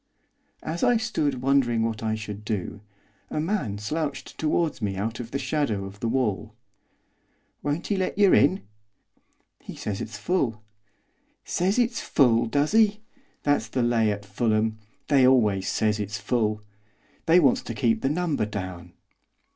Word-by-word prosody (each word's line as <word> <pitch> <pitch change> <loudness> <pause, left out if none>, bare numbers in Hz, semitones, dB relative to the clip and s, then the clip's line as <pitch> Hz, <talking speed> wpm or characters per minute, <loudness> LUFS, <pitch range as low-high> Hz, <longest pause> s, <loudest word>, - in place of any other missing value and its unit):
As 165 +2 -3
I 245 -2 +4
stood 150 - -1
wondering 130 -4 +2
what 115 -1 -2
I 110 -1 0
should 105 -1 -7
do, 105 -1 -4 0.5
a - - -2
man 155 - -1
slouched 145 +6 -4
towards 155 -2 0
me 100 -2 -1
out 110 +5 -3
of 120 -2 -6
the 140 - -2
shadow 135 -7 -1
of 100 +1 -10
the 115 - -2
wall. 115 -6 -1 1.1
'Won't 145 +7 -2
'e 200 - +2
let 185 0 -2
yer 200 -2 +5
in?' 190 - +4 1.0
'He - - -10
says 100 -2 -4
it's 110 -1 -6
full.' 110 - -1 0.8
'Says 190 +5 0
it's 240 -1 +1
full, 120 -4 +3
does 145 - 0
'e? 215 -2 +4 0.4
That's 145 -6 +1
the 125 +3 -1
lay 115 -2 +2
at 105 0 -5
Fulham, 110 +1 0 0.3
they 135 -3 +5
always 105 -7 +3
says 105 -1 +1
it's 105 0 -3
full. 105 0 -1 0.6
They 165 +2 +6
wants 140 -7 +3
to 115 - -6
keep 110 0 +1
the 135 - +1
number 155 -8 0
down. 95 -4 -6
120 Hz, 155 wpm, -25 LUFS, 105-150 Hz, 1.1 s, They